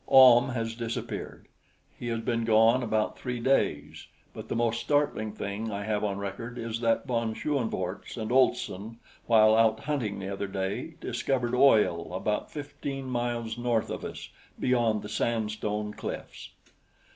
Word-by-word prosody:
Ahm 130 -1 +8
has 115 -3 -2
disappeared. 115 0 -5 0.5
He 120 - -5
has 115 -1 -1
been 115 0 -1
gone 115 +2 +5
about 110 -2 -1
three 125 -2 -3
days; 135 +3 0 0.3
but - - -8
the - - -3
most 115 0 +1
startling 145 -7 +1
thing 105 +1 -4
I 100 0 -3
have 105 0 -1
on 100 -2 -1
record 115 +5 -5
is 115 -1 -3
that 115 -1 +1
von 115 -4 -1
Schoenvorts 110 -8 -3
and 110 0 -3
Olson 115 -4 +1 0.3
while 110 -2 +6
out 110 -1 +3
hunting 135 -9 -2
the 100 0 -4
other 100 +1 -3
day 95 0 -3
discovered 125 -3 -1
oil 110 -10 +4
about 105 +3 -1
fifteen 140 -2 -6
miles 120 -1 -2
north 120 -2 0
of - - -5
us - - -7 0.3
beyond 120 -4 +2
the - - -6
sandstone 105 -2 -2
cliffs. - - -7
115 Hz, 150 wpm, -28 LUFS, 105-120 Hz, 0.5 s, Ahm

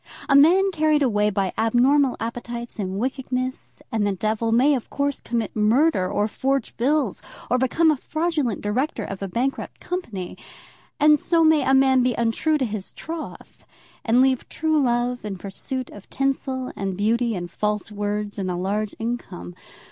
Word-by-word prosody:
A 275 - +4
man 365 +7 +6
carried 310 -3 +2
away 210 -4 +2
by 195 -2 -1
abnormal 250 +5 +3
appetites, 235 0 -6
and 190 -1 -3
wickedness, 255 +1 -4
and 215 -3 +1
the - - +1
devil, 220 +4 -1
may 260 +6 +4
of 255 -5 -3
course 285 0 -2
commit 230 -3 -3
murder, 215 - +2
or 210 - +1
forge 270 +2 -1
bills, 265 -2 0 0.3
or 250 - +3
become 315 +6 +3
a 300 - 0
fraudulent 310 - -1
director 235 +4 -1
of 195 -1 -6
a 195 - -2
bankrupt 245 +8 -3
company. 225 - -5 0.6
And 300 0 +6
so 335 +2 +2
may 315 -1 +5
a 265 +1 +3
man 265 -1 +4
be 250 -2 +1
untrue 235 +7 +1
to 265 - 0
his 210 -4 -6
troth, 320 0 -8 0.4
and 240 +2 +4
leave 260 -1 +1
true 315 -1 +1
love 245 -1 0
in 205 -2 -5
pursuit 245 +8 -5
of 205 - -13
tinsel, 265 -1 -2
and 195 -2 -3
beauty, 230 +2 +1
and 175 -1 -5
false 210 0 -2
words, 205 0 -3
and 190 -1 -2
a 180 - -1
large 200 +4 -2
income. 225 - -5
240 Hz, 170 wpm, -23 LUFS, 210-275 Hz, 0.6 s, man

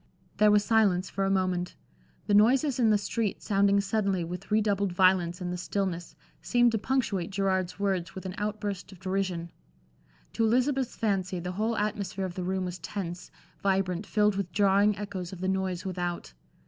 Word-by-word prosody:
There 210 0 +5
was 210 0 +4
silence 200 -5 +2
for 195 - -1
a - - +1
moment. 185 -2 0 0.5
The 205 - 0
noises 250 +6 +4
in 230 -3 +4
the 210 - +5
street 210 +1 -2
sounding 200 -1 +3
suddenly 200 -3 0
with 175 +2 -7
redoubled 205 -2 +1
violence 180 -1 +3
in 180 0 -3
the 180 - -3
stillness, 175 -3 -3 0.3
seemed 240 -1 +3
to 225 - 0
punctuate 210 -8 -1
Gerard's 190 -2 -1
words 185 -4 -1
with 190 - -7
an 185 - -4
outburst 205 -2 -3
of 190 - -14
derision. 185 -3 -2 0.8
To - - 0
Elizabeth's 255 +3 +1
fancy 190 -4 -1
the 180 +1 -4
whole 220 +4 -1
atmosphere 200 -2 -2
of 185 - -5
the 185 - -4
room 185 +1 -1
was 180 0 -5
tense, 175 -1 -5 0.3
vibrant, 190 -1 0
filled 210 -2 +2
with 190 -3 -3
jarring 200 +1 +3
echoes 195 -3 -5
of 185 - -8
the 185 - -2
noise 190 -1 -1
without. 175 - -4
195 Hz, 175 wpm, -28 LUFS, 180-210 Hz, 0.8 s, There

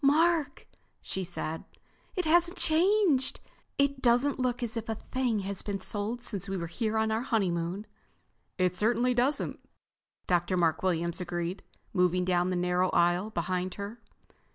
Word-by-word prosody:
"Mark," 315 +2 +3 0.3
she 190 - -4
said, 165 -2 -4 0.5
"it 365 - -1
hasn't 345 +3 +3
changed! 335 -4 +3 0.4
It 280 -1 +1
doesn't 250 +4 +3
look 250 -1 0
as 230 -1 -3
if 230 -1 -4
a 225 - 0
thing 245 -2 -1
had 195 0 -3
been 200 -1 -3
sold 215 +5 -3
since 200 -4 -3
we 195 - -2
were 170 - -3
here 215 +6 -2
on 220 0 +1
our 220 +1 0
honeymoon." 190 -5 -1 0.7
"It 180 -1 +1
certainly 235 +5 +2
doesn't," 260 +4 0 0.7
Dr. 175 +1 +1
Mark 165 -3 +2
Williams 170 -1 0
agreed, 175 +1 -3 0.3
moving 180 -1 +2
down 180 0 +2
the 185 - 0
narrow 180 +1 +1
aisle 175 +4 +2
behind 180 -1 -2
her. 205 +4 -7
205 Hz, 155 wpm, -29 LUFS, 180-250 Hz, 0.7 s, Mark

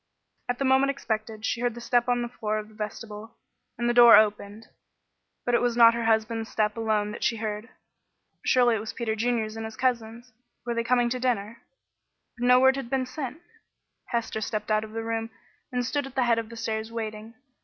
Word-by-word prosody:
At 245 - 0
the 275 - -1
moment 265 +1 +4
expected 220 -5 -3
she 235 - -1
heard 245 -2 0
the - - -7
step 240 +1 +1
on 245 0 +1
the - - -3
floor 215 -3 -3
of 215 0 -6
the - - -18
vestibule, 215 +1 -7 0.4
and 240 - -1
the 240 - +2
door 240 -1 +9
opened, 210 0 0 0.8
but 245 - 0
it 235 - +4
was 240 -1 0
not 230 -1 +8
her 235 0 -2
husband's 225 0 0
step 210 -1 0
alone 215 -2 0
that 210 - -7
she 230 - +2
heard. 215 +1 -4 0.7
Surely 245 -2 +4
it - - -2
was 220 +1 -6
Peter 225 -2 -2
Junior's 225 -1 -1
and 225 - -5
his 220 0 -7
cousin's. 240 -1 -2 0.3
Were 240 - -1
they 235 0 -1
coming 240 0 +2
to 255 - -1
dinner? 235 -3 -2 0.7
But 245 0 -1
no 250 0 +7
word 265 +1 +5
had 265 -3 -5
been 265 0 0
sent. 270 +4 -6 0.6
Hester 230 -2 -3
stepped 215 0 -3
out 215 0 +2
of 215 0 -10
the 225 0 -3
room 225 0 -3 0.4
and 250 -1 -1
stood 285 +2 -2
at 270 - -14
the 260 - +2
head 230 -1 +3
of 225 -1 -6
the 230 - -10
stairs 220 0 -3
waiting. 220 0 -6
230 Hz, 215 wpm, -26 LUFS, 220-245 Hz, 0.8 s, door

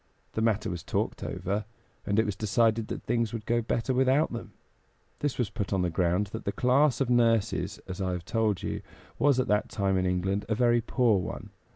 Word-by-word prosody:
The 110 - -2
matter 110 -1 +1
was 90 -4 -4
talked - - -2
over, 95 +4 -2 0.4
and 100 0 +1
it 110 - +4
was 105 -2 -2
decided 110 +2 +1
that - - -5
things 115 -1 0
would 110 -2 -5
go 120 0 +1
better 115 +3 -1
without 130 +2 +3
them. 115 - -7 0.7
This 145 -3 -1
was 115 -5 -1
put 105 -4 -4
on 95 -2 +1
the 90 - 0
ground 90 +3 +1
that - - -5
the 100 - -1
class 130 +3 +3
of 130 - +1
nurses, 115 -3 +2
as 95 +1 -5
I 95 -1 0
have 90 -1 -5
told 110 -5 0
you, - - -3 0.4
was 140 -3 +4
at 130 - +1
that 105 0 +2
time 95 -2 0
in 95 0 +1
England 95 +2 -1
a 110 - +2
very 120 0 +3
poor 115 -3 +2
one. - - -6
110 Hz, 215 wpm, -28 LUFS, 95-120 Hz, 0.7 s, it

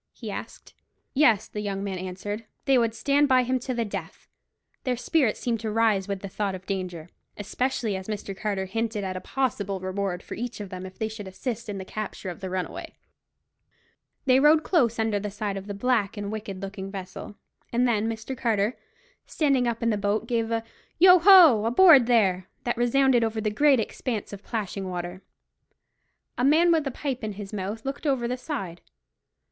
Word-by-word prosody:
he - - -7
asked. - - -8 0.4
Yes, 245 -8 +4
the 210 - -5
young 200 -1 -3
men 190 -2 -3
answered; 190 +4 -5 0.2
they 270 - +4
would 230 -2 +2
stand 285 +4 +2
by 255 -2 +4
him 255 +1 0
to 255 - -4
the 235 -1 0
death. 195 -5 -7 0.6
Their 255 -3 -1
spirits 250 -1 +1
seemed 235 -2 -1
to 220 0 -3
rise 215 -3 +2
with 200 -2 -3
the 200 - -5
thought 195 0 -2
of 185 0 -10
danger, 180 -4 -4 0.3
especially 220 +1 -2
as 190 0 -6
Mr. 205 -2 -5
Carter 195 -1 -2
hinted 225 +1 -2
at 190 -1 -3
a 185 - -4
possible 205 -6 -2
reward 185 -1 -3
for - - -8
each 240 +1 -5
of 205 -2 -6
them 185 0 -6
if 185 - -14
they 220 - -1
should 215 -2 -8
assist 230 +4 -5
in 200 - -4
the 190 - -6
capture 205 -2 -5
of 175 - -10
the 190 -2 -5
runaway. 185 0 -5 1.3
They 260 -1 +5
rowed 305 +2 +5
close 245 - +2
under 220 -2 0
the 210 +1 -4
side 205 0 -3
of 195 0 -6
the 205 - -5
black 220 -2 0
and 205 0 -4
wicked 205 -3 -6
looking 195 0 -6
vessel, 195 +1 -8 0.4
and 245 +1 +2
then 225 -1 +1
Mr. 225 +4 -5
Carter, 225 -2 0 0.5
standing 275 -5 +1
up 230 -1 -2
in 230 - +2
the 210 - 0
boat 205 +2 0
gave 230 -2 0
a 230 -1 -1 0.3
"Yo 365 +1 +8
ho! 335 - +8
aboard 265 +1 +7
there!" 190 -6 +2 0.2
that 240 - -1
resounded 245 +1 +3
over 225 0 -1
the 215 -1 -1
great 280 +3 +4
expanse 220 -1 -3
of 200 - -8
plashing 200 -4 -4
water. 175 +1 -5 1.2
A - - +1
man 320 +6 +5
with 315 -4 +2
a - - -2
pipe 260 -1 -4
in 215 -1 -3
his 200 +1 -8
mouth 210 +3 -4
looked 275 +3 -4
over 260 -4 +1
the 250 - -1
side. 245 - -5
220 Hz, 195 wpm, -26 LUFS, 195-250 Hz, 1.3 s, Yo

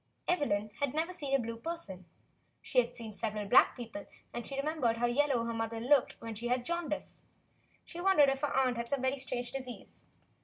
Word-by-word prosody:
Evelyn 215 - +1
had 285 -1 0
never 330 +4 0
seen 280 -6 -1
a - - +3
blue 230 -1 -4
person. 230 - -6 0.6
She 255 - +3
had 245 0 0
seen 225 -3 -7
several 210 -1 -3
black 245 - +6
people, 230 -4 -7 0.3
and 240 - -4
she 275 - -5
remembered 275 -5 +1
how 240 - +2
yellow 250 -1 +2
her 230 - -2
mother 225 0 -2
had 225 +1 -4
looked 285 -3 +5
when 230 -1 -6
she 230 +3 -4
had 250 +1 +1
the - - -16
jaundice. 340 -3 -3 0.6
She 345 - -7
wondered 355 -7 +6
if 270 0 -1
her 290 - 0
aunt 255 -2 +2
had 235 0 -3
some 270 -2 0
strange 245 -2 -3
disease. 255 -3 -7
250 Hz, 205 wpm, -32 LUFS, 230-290 Hz, 0.6 s, black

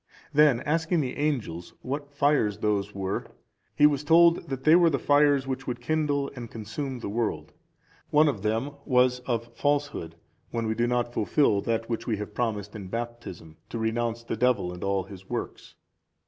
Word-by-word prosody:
Then 145 -5 +5
asking 165 +2 +1
the 125 -3 -3
angels, 120 - -2
what 140 +2 -4
fires 140 -7 +2
those 105 -1 -1
were, 95 0 -3 0.5
he 150 - +5
was 145 -1 +3
told, 170 +2 +6
they 135 +4 +3
were 170 -1 +6
the 140 - 0
fires 145 -1 +3
which 135 0 -4
would 120 -1 -3
kindle 145 +1 0
and 120 -3 -7
consume 125 +5 -5
the 120 - -6
world. 110 +2 -2 0.6
One 155 +1 +5
of 130 -9 -1
them 110 +7 -1
was 125 -2 +3
of 115 -1 -2
falsehood, 145 - -1 0.3
when 115 -1 -2
we 110 - 0
do 120 +2 0
not 120 0 0
fulfil 105 -3 +2
that 115 +1 -1
which 115 -2 -3
we 110 -3 0
promised 105 -2 -3
in 100 -3 -7
Baptism, 115 -8 -6
to - - -4
renounce 115 +1 -1
the 115 - -3
Devil 110 -6 +1
and 90 - -8
all 100 -1 0
his 95 0 -13
works. - - -5
120 Hz, 175 wpm, -27 LUFS, 110-145 Hz, 0.6 s, told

